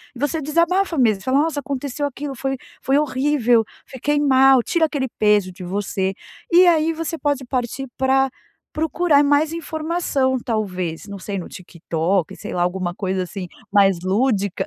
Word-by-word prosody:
e 245 - -10
você 295 +3 -1
desabafa 335 +4 +1
mesmo 215 -6 +2
fala: 260 +2 +2
"Nossa, 300 -1 0
aconteceu 280 +1 -3
aquilo 280 0 -5
foi 270 +1 -2 0.3
foi 275 +2 +2
horrível, 260 -5 +2 0.2
fiquei 290 +3 -1
mal", 270 -2 +5
tira 330 +4 +2
aquele 280 -4 -2
peso 210 -3 +3
de 185 +1 -11
você. 190 +1 -2 0.4
E 355 +1 +7
aí 325 -1 +3
você 330 0 -4
pode 285 -3 -1
partir 255 +1 -3
para 265 0 +2 0.4
procurar 315 -1 +2
mais 290 +2 +2
informação 315 -5 -1
talvez 190 -7 -3
não 200 -2 -8
sei 200 +1 -5
no 180 - -6
TikTok, 170 0 -2
sei - - -7
lá 175 - -1
alguma 180 0 -2
coisa 190 -1 -2
assim 180 0 -7 0.2
mais 195 -3 +4
lúdica, 200 0 0
265 Hz, 160 wpm, -21 LUFS, 195-295 Hz, 0.4 s, E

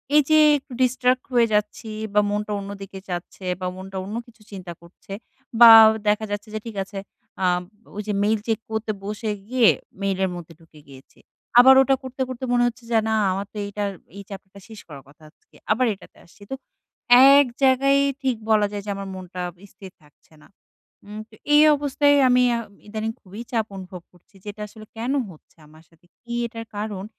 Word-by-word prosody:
এই 300 - +6
যে 310 - +6 0.2
একটু 265 - -15
distract 255 0 +1
হয়ে 235 -1 +4
যাচ্ছি 210 +1 -1 0.2
বা 210 - +4
মনটা 210 +1 -3
অন্য 195 - -8
দিকে 195 0 -9
যাচ্ছে 175 +2 -7 0.2
বা 185 - -2
মনটা 190 +1 -8
অন্য 210 +3 -6
কিছু 230 -1 -21
চিন্তা 185 -3 -8
করছে 170 +3 -13 0.5
বা 235 - +11 0.4
দেখা 210 +1 +1
যাচ্ছে 205 +1 -5
যে 215 - -2
ঠিক 225 - -8
আছে 195 0 -8 0.4
আ - - +3 0.5
ওই 210 - -3
যে 210 - -1
মেইল 215 +1 +1
চেক 225 -1 0
করতে 220 0 -2
বসে 210 +2 -4 0.2
গিয়ে 245 -2 +4 0.3
মেইলের 190 -1 0
মধ্যে 170 -1 -10
ঢুকে 160 -2 -19
গিয়েছি। 135 -1 -17 0.4
আবার 265 +2 +8
ওটা 270 +1 +3
করতে, 260 0 -7
করতে 255 0 -7
মনে 245 0 +3
হচ্ছে 240 0 -6
যে 230 - +3
না 220 - +1 0.2
আমার 195 +2 -3
তো - - -10
এইটা 205 +1 -5 0.3
এই 200 - -8
চ্যাপ্টারটা 195 0 -11
শেষ 220 -2 -12
করার 140 -4 -11
কথা 150 +3 -21
আজকে 150 - -31 0.2
আবার 255 +4 +2
এটাতে 195 - -17
আসছি 175 - -23
তো - - -2 0.8
১ 285 - +6 0.2
জায়গায় 275 +1 +4 0.2
ঠিক 260 -2 0 0.2
বলা 210 -1 +3
যায় 205 -1 -6
যে - - -6
আমার 195 0 -7
মনটা 180 -1 -8 0.3
স্থির 190 -1 -13
থাকছে 150 +2 -26
না। - - -19 0.6
উম 210 +1 -8
তো 220 - -18 0.2
এই 295 - +7 0.2
অবস্থায় 285 0 +2
আমি 250 0 +4
আ - - -3 0.3
ইদানিং 220 +1 -4
খুবই 200 +4 -10
চাপ 225 -3 0
অনুভব 185 -1 -9
করছি 180 +3 -27
যে - - -15
এটা 210 - -12
আসলে 215 +1 -13
কেন 240 +4 -2 0.2
হচ্ছে 165 -2 -18
আমার 155 +1 -19
সাথে? 165 0 -28 0.2
কি 235 0 -8
এটার 230 -1 -9
কারণ? 205 -2 -5
210 Hz, 195 wpm, -22 LUFS, 190-235 Hz, 0.8 s, বা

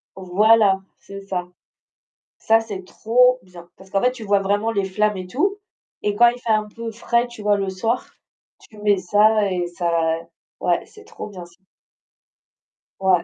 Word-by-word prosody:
Voilà, 195 +1 +3 0.2
c'est 195 0 -10
ça. 185 -2 -4 0.9
Ça, 225 0 +3
c'est 200 -4 -7
trop 250 +6 +3
bien, 175 -2 -14
parce 190 0 -16
qu'en 195 0 0
fait, 250 - +3
tu 245 -3 -9
vois 200 -1 +2
vraiment 205 +3 0
les 200 -3 0
flammes 210 +2 0
et 185 -1 -6
tout, 390 - 0 0.4
et 205 -1 -1
quand 240 +2 +7
il 245 +1 0
fait 235 -2 -2
un 215 -1 +2
peu 230 +2 -7
frais, 235 +2 0
tu 240 -3 -11
vois, 205 0 +2
le 195 -1 -2
soir, 225 +6 -1 0.5
tu 215 - -18
mets 205 -1 +3
ça 205 +3 +3
et 180 -1 -1
ça 170 -2 0 0.4
ouais, - - +1
c'est 425 - -16
trop 450 - -8
bien, 185 -4 -9
ça. 175 0 -20 1.4
Ouais, 185 -3 +3
205 Hz, 175 wpm, -21 LUFS, 190-225 Hz, 1.4 s, quand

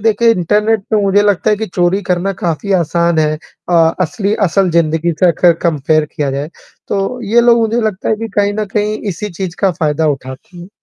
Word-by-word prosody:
देखिए, 225 +2 +3
इंटरनेट 210 +3 +1
पे 215 -2 +2
मुझे 200 +1 +3
लगता 205 +1 +1
है 210 - +2
कि 220 +1 -4
चोरी 180 +2 0
करना 180 +2 0
काफ़ी 175 +4 -1
आसान 170 0 0
है 155 -1 +2 0.4
अ, - - +1 0.3
असली 200 +3 -1
असल 190 +2 +1
ज़िंदगी 165 0 +1
से 185 - +5
अगर 170 +1 +3
कंपेयर 155 -1 +1
किया 145 -2 -1
जाए, 140 +3 -4 0.4
तो 200 +5 -2
ये 225 +2 +3
लोग 235 0 +4
मुझे 230 +2 -1
लगता 215 -4 -2
है 220 - +1
कि 225 +1 -5
कहीं 205 0 +1
न 215 0 -1
कहीं 210 0 0 0.2
इसी 210 +5 -6
चीज़ 180 -1 -6
का 195 - +3
फ़ायदा 155 0 +1
उठाते 130 +7 -12
हैं। 175 +1 -10
190 Hz, 205 wpm, -14 LUFS, 165-210 Hz, 0.4 s, से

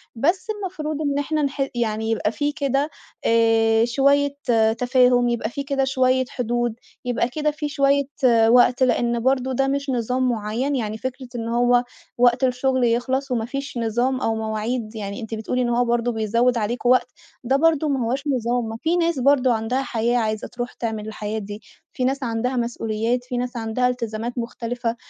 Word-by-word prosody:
بس 335 - 0
المفروض 360 -8 -4
إن 285 -2 0
إحنا 305 +2 -1
نح 275 -1 -1
يعني 220 -1 -1
يبقى 220 -1 0
في 290 +4 -1
كده، 280 0 0 0.4
آآ، 225 0 +4
شوية 280 +3 +2 0.4
تفاهم 250 -1 +3
يبقى 230 -2 -1
في 280 +4 -5
كده 275 -1 +1
شوية 260 -1 +2
حدود، 240 -3 -1 0.3
يبقى 245 0 0
كده 300 +3 -1
في 300 0 -4
شوية 280 0 +2 0.2
آآ، 230 -3 +5
وقت 250 +2 +5
لأن 240 -1 +1
برضه 260 +1 +1
ده 270 +2 +1
مش 280 0 -1
نظام 250 +1 0
معيّن، 230 +5 -1
يعني 220 -4 -2
فكرة 260 +2 -5
إن 230 -1 -3
هو 245 +1 +3 0.3
وقت 245 +1 +3
الشغل 260 0 +1
يخلص، 255 +3 0
ومافيش 250 +4 -3
نظام 240 +3 0
أو 225 - 0
مواعيد 220 +1 -3
يعني 200 +1 -5
أنتِ 225 0 -7
بتقولي 225 +3 -2
إن 245 - 0
هو 240 +1 +2
برضه 240 0 +1
بيزوّد 230 +2 +1
عليكم 235 +3 -1
وقت، 255 0 +4 0.4
ده 265 +3 +1
برضه 315 0 +3
ما 265 -4 0
هوّاش 260 +4 -1
نظام، 245 -3 0
ما 225 0 -5
في 330 +2 +1
ناس 335 -4 +1
برضه 260 -2 +4
عندها 225 +4 -1
حياة 240 -1 0
عايزة 215 -2 -1
ترُوح 245 0 -6
تعمل 220 -2 -4
الحياة 215 0 -4
دي، 205 +1 -8 0.3
في 255 - -3
ناس 270 +1 -1
عندها 245 +2 -1
مسؤوليات، 235 0 -1
في 250 0 -4
ناس 245 0 -3
عندها 225 +2 0
إلتزامات 235 -1 -3
مختلفة 235 0 -3
245 Hz, 175 wpm, -22 LUFS, 230-270 Hz, 0.4 s, آآ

